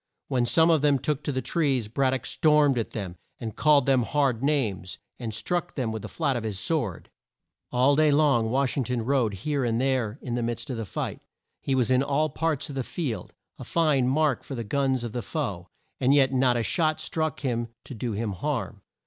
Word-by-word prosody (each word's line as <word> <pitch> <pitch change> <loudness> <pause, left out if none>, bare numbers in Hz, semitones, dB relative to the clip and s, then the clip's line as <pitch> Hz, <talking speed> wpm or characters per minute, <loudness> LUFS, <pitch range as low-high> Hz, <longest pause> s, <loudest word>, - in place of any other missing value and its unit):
When 125 -2 +1
some 165 +6 +5
of 160 -3 +3
them 145 -1 +4
took 150 +2 -2
to - - 0
the 130 -2 -2
trees, 135 -9 0
Brad 130 +4 +1
dock 130 - -3
stormed 150 -4 +3
at 115 - -3
them, 95 -5 -6 0.2
and 110 -2 -5
called 145 -3 +4
them 135 -2 +3
hard 130 -1 +1
names, 115 -11 -1 0.2
and 115 -3 -4
struck 175 +11 -2
them 125 -5 -1
with 110 -1 -4
the - - -6
flat 145 -5 -1
of 120 - -1
his 105 -3 -3
sword. 115 - -1 0.6
All 130 +3 +4
day 155 +1 +4
long 140 -6 +3
Wash 130 +2 +1
ing 135 - +2
ton 125 -1 -2
rode 120 -5 +1
here 140 +7 -2
and 115 -1 0
there 130 -4 0
in 125 - -4
the 120 - -1
midst 120 +4 -3
of 125 - -3
the 115 - -3
fight. - - -4 0.4
He 135 - 0
was 130 -1 +2
in 130 0 +4
all 145 +3 +1
parts 155 -1 -1
of 145 - -7
the 135 - -2
field, 125 - -4 0.2
a - - -6
fine 150 -6 +2
mark 145 0 +1
for 135 - -6
the 115 - -3
guns 130 +2 0
of 120 - -4
the 120 - -3
foe, 100 - -4 0.3
and 135 +2 +4
yet 135 -2 +4
not 125 -2 +3
a 115 - 0
shot 155 +3 +1
struck 155 -3 -2
him 120 -4 -1 0.2
to - - -9
do 115 0 -3
him 105 +1 -2
harm. 105 -2 -3
130 Hz, 225 wpm, -26 LUFS, 115-145 Hz, 0.6 s, some